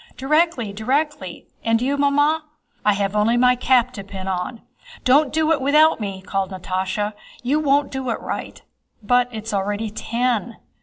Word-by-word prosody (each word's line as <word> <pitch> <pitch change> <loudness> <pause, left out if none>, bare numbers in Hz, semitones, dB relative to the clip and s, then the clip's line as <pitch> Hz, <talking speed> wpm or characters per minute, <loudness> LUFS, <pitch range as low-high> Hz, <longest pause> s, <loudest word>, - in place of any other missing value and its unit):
"Directly! 275 -6 +1
Directly! 250 - -2 0.2
And 225 0 +2
you, 265 +4 0
Mamma?" 290 +2 +2 0.4
"I 210 - +4
have 200 0 -1
only 220 +3 +3
my 250 0 +5
cap 250 0 +2
to 200 - -7
pin 190 -1 -8
on." 190 +5 -3 0.4
"Don't 275 +2 +4
do 315 0 +1
it 315 - +2
without 300 +3 +4
me!" 195 -3 -5
called 195 -1 -2
Natásha. 190 +2 -2 0.3
"You 280 +5 +1
won't 285 -1 +2
do 265 -2 -3
it 230 - -1
right." - - -6 0.4
"But 245 +3 +3
it's 220 -1 -6
already 205 +2 -1
ten." 235 +1 -1
240 Hz, 160 wpm, -21 LUFS, 205-280 Hz, 0.4 s, my